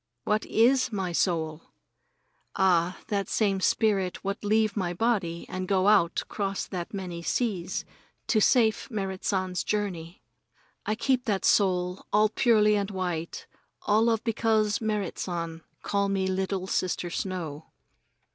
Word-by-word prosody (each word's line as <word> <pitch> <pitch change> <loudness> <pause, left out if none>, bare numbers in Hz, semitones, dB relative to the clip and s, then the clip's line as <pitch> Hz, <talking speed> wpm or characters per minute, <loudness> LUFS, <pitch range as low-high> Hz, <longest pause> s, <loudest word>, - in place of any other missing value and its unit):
What 210 +7 0
is 250 +2 +3
my 190 -4 -2
soul? 165 -2 -1 0.8
Ah, 180 -2 +2
that 200 -2 -1
same 200 -3 +1
spirit 195 -2 +1
what 200 +2 -3
leave 215 0 +2
my 175 -4 -2
body 190 -6 0
and 185 0 -4
go 190 0 +2
out 200 -5 +4
'cross 195 -1 -3
that 175 -2 -5
many 180 -4 -5
seas 190 -2 -2 0.4
to 215 - +2
safe 225 0 +3
Merrit 195 -4 -4
San's 185 -2 -1
journey. 185 -5 -3 0.6
I 215 - +1
keep 255 +2 0
that 205 -5 0
soul 180 -2 +2
all 210 +1 +4
purely 215 -2 +4
and 200 -1 -1
white 180 -4 -4 0.4
all 220 +3 +3
of 225 -1 0
because 220 0 +1
Merrit 210 -4 -2
San 165 -2 -4 0.2
call 200 -1 0
me 195 -1 0
Little 190 0 -1
Sister 180 -2 -1
Snow. 165 -6 -4
195 Hz, 135 wpm, -27 LUFS, 180-215 Hz, 0.8 s, out